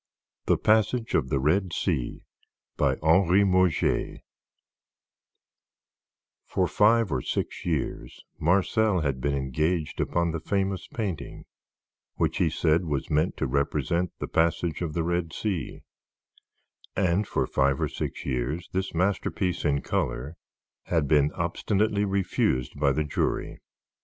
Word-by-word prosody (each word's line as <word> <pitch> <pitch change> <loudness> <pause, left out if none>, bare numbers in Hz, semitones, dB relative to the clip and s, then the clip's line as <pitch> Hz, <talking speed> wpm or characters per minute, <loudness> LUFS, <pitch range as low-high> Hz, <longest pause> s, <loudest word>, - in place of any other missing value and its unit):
THE - - +4
PASSAGE 110 +2 +2
OF 65 - +1
THE 70 - +1
RED 85 +6 +1
SEA 70 -10 -2 0.5
BY - - +2
HENRY 90 +4 +5
MURGER 95 -3 +2 2.3
For - - +1
five 110 -1 +3
or 65 - 0
six - - -3
years 80 -5 -3 0.2
Marcel 95 +3 +2
had 70 -4 -1
been 70 +2 0
engaged 75 +4 -1
upon 85 -1 0
the 80 - -3
famous 95 +3 -1
painting 95 - -5 0.7
which - - 0
he 85 - +2
said 80 +2 +1
was 70 -4 -3
meant 75 +4 +1
to - - -1
represent 75 +6 0
the - - -4
Passage 85 0 0
of 80 -3 -2
the 85 - 0
Red 85 -1 -1
Sea; 95 -7 -3 1.1
and 95 +2 +1
for - - 0
five 70 0 +1
or - - +1
six - - -5
years 65 +6 -2
this 95 -1 -2
masterpiece 95 0 0
in 70 -3 +1
color 70 +7 -2 0.5
had 80 -5 +1
been 75 0 +3
obstinately 105 0 0
refused 95 -9 0
by 70 -2 +3
the 75 +3 0
jury. 75 - -2
85 Hz, 130 wpm, -26 LUFS, 75-95 Hz, 2.3 s, HENRY